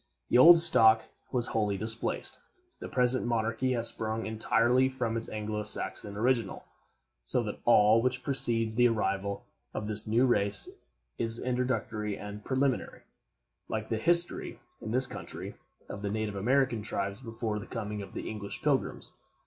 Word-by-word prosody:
The - - +3
old 170 +6 +9
stock 115 -10 +6 0.3
was 125 -3 -2
wholly 105 -3 0
displaced. 110 +3 +1 0.4
The - - -8
present 125 -1 +1
monarchy 115 +2 -1
has 115 -1 +2
sprung 110 0 -3
entirely 115 +4 +1
from 125 -4 -3
its 115 - -1
Anglo 105 0 -4
Saxon 105 -1 -4
original; 115 -2 -1 0.6
so - - +1
that - - -6
all 105 +2 +5
which 125 +1 -1
precedes 115 -5 +2
the 120 +2 +4
arrival 100 -3 -2 0.3
of 105 - -4
this 105 +1 -2
new 115 +4 +2
race 100 -5 +1 0.5
is 115 0 +2
introductory 120 -5 -3
and 105 0 -9
preliminary, 130 +1 -2 0.7
like - - -4
the 110 - -1
history, 170 +7 +3 0.2
in - - -7
this 130 +3 +6
country, - - -6 0.3
of 100 - -8
the 100 - -3
native 110 0 -3
American 125 +3 0
tribes 100 +1 -4
before 115 -3 -4
the 100 - -10
coming 105 -3 -5
of 100 - -11
the - - -6
English 105 -2 -7
Pilgrims. - - -1
115 Hz, 155 wpm, -29 LUFS, 105-125 Hz, 0.7 s, old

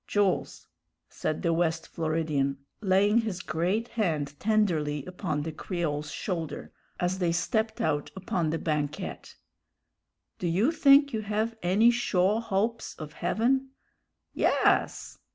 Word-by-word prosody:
"Jools," 205 -3 0 0.4
said 155 - -3
the 170 -2 +2
West 165 -1 0
Floridian, 155 -4 -1 0.2
laying 205 +2 +4
his 215 -6 -2
great 185 +9 -1
hand 155 -10 -1
tenderly 165 -10 +1
upon 180 -5 -3
the 160 - -4
Creole's 155 -3 -3
shoulder, 165 -6 -4 0.3
as 180 +2 0
they 175 -2 +1
stepped 220 +6 0
out 145 -2 0
upon 180 -3 -1
the 165 - 0
banquette, 150 -2 -3 1.0
"do 180 - -1
you 195 - +2
think 280 -3 +5
you 220 - -1
have 215 +2 -1
any 200 +7 +4
shore 215 -3 +1
hopes 225 +2 -1
of 150 -1 -8
heaven?" 260 - +1 0.6
"Yass!" - - +1
180 Hz, 125 wpm, -28 LUFS, 160-220 Hz, 1.0 s, think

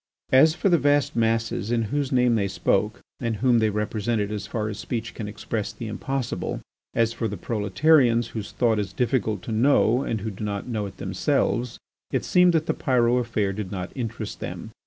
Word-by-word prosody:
As 155 +5 +6
for 175 - 0
the 175 -3 +4
vast 145 0 +2
masses 115 -1 0
in 115 -1 +2
whose 145 -2 0
name 125 -2 +3
they 105 -3 +1
spoke 105 +3 0 0.2
and 115 -2 -1
whom 120 +2 +3
they 110 -1 +2
represented 105 0 -1
as 105 -1 -4
far 110 -1 -2
as 105 -1 -5
speech 115 -3 -4
can 110 - -5
express 105 0 -4
the 115 - -8
impossible—as 115 -1 -3
for 115 - -2
the 105 -1 -5
proletarians 115 - +2
whose 110 -3 -6
thought 115 -3 +1
is 100 -2 -3
difficult 110 -6 0
to - - -6
know 120 +1 +3
and 115 -6 -2
who 110 +1 -3
do 100 - -8
not 100 -1 -3
know 110 -4 -2
it 95 - -12
themselves, 120 +4 0 0.3
it - - -1
seemed 180 -1 +5
that 160 -1 +2
the - - 0
Pyrot 125 -2 +2
affair 105 -4 -1
did 95 -2 -5
not 95 -2 -4
interest 120 -5 -5
them. - - -6
115 Hz, 195 wpm, -25 LUFS, 105-125 Hz, 0.3 s, As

